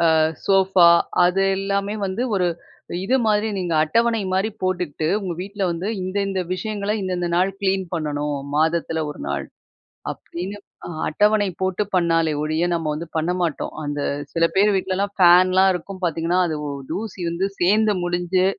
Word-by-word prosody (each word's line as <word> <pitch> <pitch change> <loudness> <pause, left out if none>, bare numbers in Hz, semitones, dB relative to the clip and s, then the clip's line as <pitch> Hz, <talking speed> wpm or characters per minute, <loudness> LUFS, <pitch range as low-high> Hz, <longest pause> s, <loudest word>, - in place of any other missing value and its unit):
அ - - +4 0.3
sofa 190 -2 +5 0.4
அது 180 +2 +3 0.2
எல்லாமே 200 +1 -1
வந்து, 190 +5 -3
ஒரு 180 -2 +2 0.6
இது 255 - +2
மாரி 215 0 +2
நீங்க 175 -3 -2
அட்டவணை 230 +6 +1
மாரி 195 +4 +1
போட்டுக்கிட்டு, 180 -5 -1
"உங்க 180 -3 -3
வீட்டுல 200 +1 -4
வந்து 170 +4 -3
இந்தந்த 195 0 -1
விஷயங்கள, 205 +1 -3
இந்தந்த 180 -2 -2
நாள் 185 +2 +2
கிளீன் 190 -1 0
பண்ணணும், 150 -2 -2 0.2
மாதத்துல 160 0 +1
1 150 - -8
நாள்", - - -2 0.7
அப்படின்னு 185 +4 -7 0.3
அ - - -7 0.2
அட்டவணை 205 +4 +2
போட்டு 190 +2 0
பண்ணாலே 165 -3 +2
ஒழிய, 155 +3 0
நம்ம 165 -2 -2
வந்து 165 +2 -6
பண்ண 165 +3 0
மாட்டோம். 165 -4 -2
அந்த 145 0 -3 0.3
சில 165 0 +3
பேரு 205 +1 +5
வீட்டுலலாம் 190 +1 -1
ஃபேன்லாம் 185 +2 +6
இருக்கும் 185 +2 -7
பார்த்தீங்கன்னா, 170 +2 0
அது 155 -2 -2
ஒ - - -3 0.2
தூசி 195 +1 -5
வந்து 185 +3 -1
சேந்து 210 +3 +3
முடிஞ்சு, 175 +1 +1
185 Hz, 150 wpm, -22 LUFS, 170-195 Hz, 0.7 s, ஃபேன்லாம்